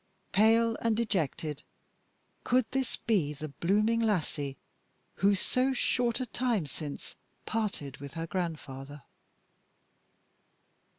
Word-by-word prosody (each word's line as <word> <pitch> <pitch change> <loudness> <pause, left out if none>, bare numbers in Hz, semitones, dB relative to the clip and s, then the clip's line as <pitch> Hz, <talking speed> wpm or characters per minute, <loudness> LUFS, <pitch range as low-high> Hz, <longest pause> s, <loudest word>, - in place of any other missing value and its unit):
Pale 225 +3 +4
and 225 -2 +2
dejected, 160 - -1 0.8
could 250 -1 +3
this 265 -2 -1
be 185 -11 +1
the 150 +1 -6
blooming 210 +10 +2
lassie 155 - 0 0.6
who 200 +1 +4
so 255 +7 +1
short 245 -1 +1
a 255 - -1
time 240 -8 0
since 145 +1 -7 0.3
parted 200 -11 -2
with 140 +2 -9
her 165 0 -2
grandfather? 145 -6 -4
195 Hz, 105 wpm, -31 LUFS, 150-230 Hz, 0.8 s, Pale